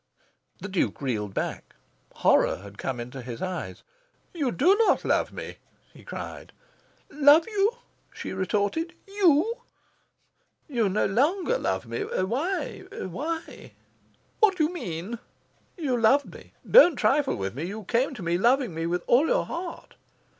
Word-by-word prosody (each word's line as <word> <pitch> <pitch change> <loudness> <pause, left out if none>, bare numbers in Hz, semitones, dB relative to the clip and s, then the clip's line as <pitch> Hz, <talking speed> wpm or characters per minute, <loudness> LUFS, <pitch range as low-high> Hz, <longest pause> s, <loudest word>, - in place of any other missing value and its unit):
The - - -6
Duke 190 -2 -1
reeled 105 -8 -3
back. - - -4 0.4
Horror - - +3
had 100 0 -13
come 130 -2 -3
into 125 +3 -7
his 120 -1 -7
eyes. 185 -1 -5 0.5
"You 290 -8 -1
do 360 - +4
not - - +2
love - - +1
me!" - - -8 0.4
he - - -15
cried. - - -8 0.6
"LOVE 295 +2 +6
you?" 415 0 +1 0.4
she - - -6
retorted. 205 - -1
"YOU?" 395 +1 +3 1.1
"You 235 -8 +1
no 200 +3 +1
longer 300 - +1
love 95 0 -1
me. 115 0 -5
Why? 270 - -2
Why?" 320 - -6 0.7
"What 405 -4 +4
do 315 - +2
you 310 +4 0
mean?" 195 - -5 0.6
"You 285 -7 -1
loved 275 +6 +3
me. - - -14
Don't 355 - +8
trifle 280 +2 +2
with 95 0 -4
me. 145 +7 -4
You 210 +4 -6
came 250 +7 0
to 210 - -8
me 170 +1 0
loving 245 -1 +2
me 165 +1 -3
with 175 +1 -1
all 270 +7 +4
your - - +1
heart." 340 0 -7
240 Hz, 145 wpm, -26 LUFS, -, 1.1 s, Don't